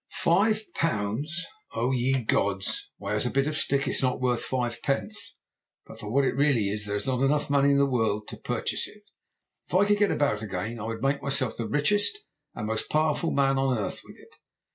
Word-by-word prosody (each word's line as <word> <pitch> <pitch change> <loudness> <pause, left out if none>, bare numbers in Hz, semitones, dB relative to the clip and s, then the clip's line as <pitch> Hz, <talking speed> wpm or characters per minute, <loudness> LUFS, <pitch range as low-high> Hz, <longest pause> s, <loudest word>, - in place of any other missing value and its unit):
"'Five 215 +5 +2
pounds! 145 - -1 0.3
O 120 +3 +1
ye 130 0 +1
gods! 100 -3 0
Why, 100 0 -4
as 105 +4 +1
a - - 0
bit 135 +2 +1
of 150 +1 -2
stick 140 -2 +1
it's - - +1
not 130 -1 +1
worth 125 -2 +1
five 120 -3 -2
pence, 205 +10 -2 0.5
but - - -12
for 105 - -7
what 140 +2 +3
it - - +1
really 135 -7 +2
is 105 0 -3
there 100 - -2
is 105 - -3
not 130 -2 0 0.3
money 140 0 +4
enough - - +5
in 140 - +4
the 140 - +4
world 110 -5 0
to - - -8
purchase - - -2
it. - - -16 0.6
If - - -4
I 195 +2 +5
could 205 0 +2
get 205 -1 +4
about 140 -8 +1
again 110 +3 -4
I 105 - -5
would 115 +1 -4
make 140 +1 +1
myself 135 -3 0
the 115 - -3
richest 205 - +2 0.4
and 105 - -4
most 110 0 -2
powerful 155 +1 +1
man 135 -1 +2
on 135 -2 +1
earth 105 - -3
with - - -14
it. - - -19
130 Hz, 215 wpm, -27 LUFS, 110-145 Hz, 0.6 s, enough